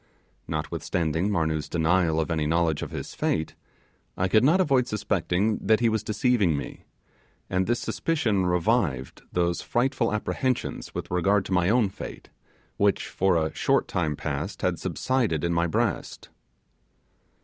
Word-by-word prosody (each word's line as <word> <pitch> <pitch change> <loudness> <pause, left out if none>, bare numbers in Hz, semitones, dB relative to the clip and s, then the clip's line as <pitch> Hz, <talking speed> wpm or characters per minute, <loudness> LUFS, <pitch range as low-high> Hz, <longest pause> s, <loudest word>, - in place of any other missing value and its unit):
Notwithstanding 80 +3 -1
Marnoo's 80 -6 -1
denial 85 0 +2
of 80 +1 -1
any 80 -2 0
knowledge 80 -1 +1
of - - -4
his - - -6
fate, 80 -1 -1 0.6
I 90 - +1
could 110 +4 +4
not 160 +8 +4
avoid 135 -8 +3
suspecting 105 -1 0
that 110 +2 +3
he 120 -1 +3
was 110 -1 0
deceiving 105 - +2
me; - - -7 0.7
and 95 0 +1
this 120 +1 0
suspicion 110 - 0
revived 90 - 0
those 85 -1 0
frightful 125 -2 0
apprehensions 125 +4 -2
with - - -5
regard 95 +3 +2
to 95 - -3
my 90 0 +3
own 115 -2 +3
fate, 95 - -9 0.5
which, 100 -1 +1
for 95 -1 +1
a 80 -1 0
short - - +1
time 80 -4 -1
past, - - -4
had - - 0
subsided 115 - 0
in 85 0 +1
my 85 +1 +2
breast. 80 - -2
95 Hz, 150 wpm, -26 LUFS, 80-110 Hz, 0.7 s, could